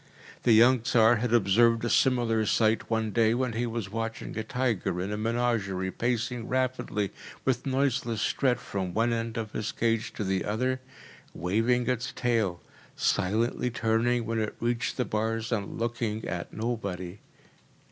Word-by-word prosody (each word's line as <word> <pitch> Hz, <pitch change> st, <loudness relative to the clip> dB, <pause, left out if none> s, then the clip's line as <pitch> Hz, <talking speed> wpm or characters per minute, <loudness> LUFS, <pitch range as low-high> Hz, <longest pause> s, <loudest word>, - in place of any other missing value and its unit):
The 115 Hz, -, +4 dB
young 120 Hz, +3 st, +6 dB
Tsar 115 Hz, -1 st, +4 dB
had 120 Hz, +1 st, -1 dB
observed 115 Hz, +2 st, +4 dB
a -, -, 0 dB
similar 120 Hz, -4 st, +3 dB
sight 110 Hz, 0 st, +2 dB
one 110 Hz, -1 st, 0 dB
day 115 Hz, +1 st, +3 dB
when 125 Hz, -1 st, -1 dB
he 120 Hz, +2 st, -1 dB
was 110 Hz, -4 st, -4 dB
watching 115 Hz, 0 st, -4 dB
a 110 Hz, -, -2 dB
tiger 115 Hz, -7 st, -1 dB
in 95 Hz, +3 st, -3 dB
a -, -, -1 dB
menagerie 110 Hz, -4 st, -1 dB
pacing 120 Hz, 0 st, -2 dB
rapidly 130 Hz, -5 st, -1 dB, 0.3 s
with 130 Hz, 0 st, 0 dB
noiseless 130 Hz, -4 st, 0 dB
tread 125 Hz, -3 st, +1 dB
from 95 Hz, -5 st, -4 dB
one 115 Hz, +2 st, +2 dB
end 115 Hz, 0 st, -3 dB
of 110 Hz, -2 st, -3 dB
his 110 Hz, 0 st, -3 dB
cage 115 Hz, -1 st, 0 dB
to -, -, -3 dB
the 95 Hz, -2 st, 0 dB
other, 130 Hz, +5 st, -1 dB, 0.5 s
waving 115 Hz, +8 st, +1 dB
its 125 Hz, 0 st, -1 dB
tail, 110 Hz, -8 st, 0 dB, 0.3 s
silently 115 Hz, +6 st, +1 dB
turning 115 Hz, +1 st, +1 dB
when 115 Hz, 0 st, -1 dB
it 110 Hz, -1 st, -2 dB
reached 120 Hz, +1 st, -1 dB
the 125 Hz, -, +1 dB
bars, 110 Hz, +1 st, -2 dB
and 105 Hz, -4 st, -2 dB
looking 115 Hz, -2 st, -2 dB
at 85 Hz, -2 st, -4 dB
nobody. 100 Hz, -5 st, -4 dB
115 Hz, 155 wpm, -28 LUFS, 110-120 Hz, 0.5 s, young